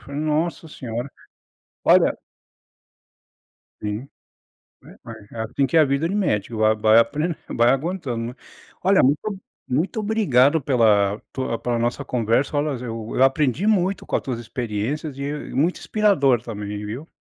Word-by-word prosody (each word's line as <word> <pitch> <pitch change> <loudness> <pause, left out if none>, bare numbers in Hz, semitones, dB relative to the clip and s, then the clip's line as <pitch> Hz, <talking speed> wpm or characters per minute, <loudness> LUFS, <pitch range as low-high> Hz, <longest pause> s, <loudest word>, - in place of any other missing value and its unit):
falei: 140 +1 -6
"Nossa 155 +2 -1
senhora". 125 -4 -5 0.8
Olha - - +5 1.7
Sim. 105 +6 -4 0.7
Né, - - -15
mas 110 -3 -11
é 115 - -8
assim 115 +5 0
que 135 +5 +1
é - - +7
a 155 - +6
vida 140 +4 0
de 195 - -2
médico. 115 - -1
Vai, 110 0 +4
vai 110 +1 +5
apren 150 +7 0
vai 120 0 +3
aguentando, 135 -6 -2
né. 125 - -8 0.5
Olha 195 +1 +5
muito 140 +3 +3
o 195 -2 -7 0.2
muito 175 - -1
obrigado 160 - +3
pela 110 -6 +3
tua 130 -3 -2
pela 120 0 -2
nossa 120 +1 -1
conversa. 125 +4 0
Olhas 145 -4 -1
eu 115 -2 -5
eu 130 - +4
aprendi 135 - +2
muito 195 -3 +1
com - - -2
a - - +1
tuas 125 -3 -4
experiências 120 +5 -4
e 140 +1 -3 0.2
muito 160 +7 +1
inspirador 160 - +2
também, 105 -2 -6
viu. 120 +10 -6
130 Hz, 155 wpm, -22 LUFS, 115-155 Hz, 1.7 s, é